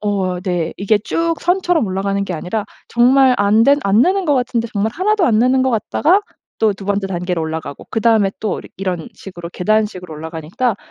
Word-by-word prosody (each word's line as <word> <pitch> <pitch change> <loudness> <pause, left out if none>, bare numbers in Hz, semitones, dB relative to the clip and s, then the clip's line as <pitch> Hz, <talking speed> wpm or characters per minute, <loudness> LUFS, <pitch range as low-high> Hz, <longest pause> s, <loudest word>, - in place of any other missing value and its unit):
어, 190 -4 -1
네. 175 -3 -2
이게 205 +2 +2
쭉 330 +10 -1
선처럼 355 -4 +1
올라가는 195 +1 -1
게 185 - -4
아니라 180 +6 -3 0.2
정말 255 +2 +4
안 205 +2 +4
된 280 +2 +5
안 200 +2 +3
느는 375 +3 +1
것 295 - +2
같은데 240 -2 -1
정말 210 +1 -1
하나도 395 - +1
안 220 -3 +3
느는 255 +2 +3
것 260 - +1
같다가 300 - +2 0.4
또 220 -2 +3
2 195 0 -10
번째 200 0 -1
단계로 180 -2 -2
올라가고 160 -3 -5
그다음에 225 -3 +2
또 215 - -2
이렇 - - -13
이런 180 -4 -3
식으로 175 -3 -9
계단식으로 195 -4 -1
올라가니까 160 +9 -3
210 Hz, 390 characters per minute, -18 LUFS, 185-250 Hz, 0.4 s, 된